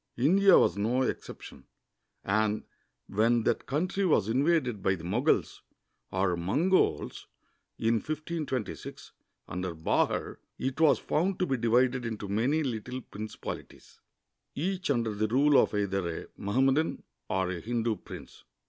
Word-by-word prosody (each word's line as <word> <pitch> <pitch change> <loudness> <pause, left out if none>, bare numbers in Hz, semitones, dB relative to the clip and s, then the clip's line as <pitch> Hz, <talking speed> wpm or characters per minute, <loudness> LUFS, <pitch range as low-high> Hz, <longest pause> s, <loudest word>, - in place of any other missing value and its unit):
India 185 +9 +6
was - - +3
no 120 +6 +1
exception, - - -6 0.6
and 110 +1 +1 0.4
when 115 +3 +2
that - - 0
country 180 +8 -1
was 150 - +3
invaded 130 - +1
b}'' 95 0 +1
the 80 - -11
Moguls, 120 - 0 0.5
or 95 -1 +1
Mongols, 145 - +1 0.5
in 115 +1 +2
1526, 155 - -5 0.4
under 90 -1 -4
Bahar, 80 - 0 0.2
it 130 +3 -3
was 155 -3 +6
found 180 +5 0
to 185 - +1
be 135 - 0
divided 125 +2 +2
into 110 -3 -4
many 125 +10 +1
little 125 0 -4
principalities, 110 -1 -8 0.6
each 180 +3 -2
under 115 -5 +1
the 105 +1 0
rule 140 +5 +5
of - - -1
either 95 -4 -1
a - - -15
Mohammedan 135 +9 +1 0.3
or 95 -1 0
a 90 - -4
Hindu 115 +2 -1
prince. - - -11
120 Hz, 130 wpm, -29 LUFS, 105-150 Hz, 0.6 s, India